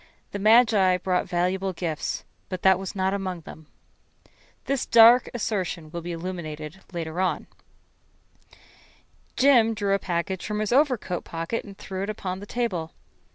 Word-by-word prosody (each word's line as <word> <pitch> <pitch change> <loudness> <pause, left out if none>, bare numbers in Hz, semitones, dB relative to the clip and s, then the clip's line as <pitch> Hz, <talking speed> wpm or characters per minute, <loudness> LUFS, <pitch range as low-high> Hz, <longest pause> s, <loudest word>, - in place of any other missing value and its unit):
The 200 - -4
magi 215 -4 +5
brought 180 0 -1
valuable 185 +2 0
gifts 165 -3 -3 0.2
but 185 -1 -5
that 190 -1 +5
was 195 +1 -6
not 190 0 0
among 185 -3 -3
them. 155 -1 -12 1.0
This 275 -2 -1
dark 235 +2 +7
assertion 185 -8 -3
will 170 - -5
be 175 +1 -5
illuminated 165 -2 -6
later. 170 +1 -2 1.9
Jim 240 -5 +5
drew 200 -2 0
a 200 - +2
package 180 0 -2
from 210 0 -3
his 215 +2 -1
overcoat 255 - +1
pocket 165 +7 -4
and 200 -2 -11
threw 190 -1 -6
it 200 - -3
upon 190 -3 -4
the 205 - -10
table. 190 -10 -2
190 Hz, 145 wpm, -25 LUFS, 175-215 Hz, 1.9 s, dark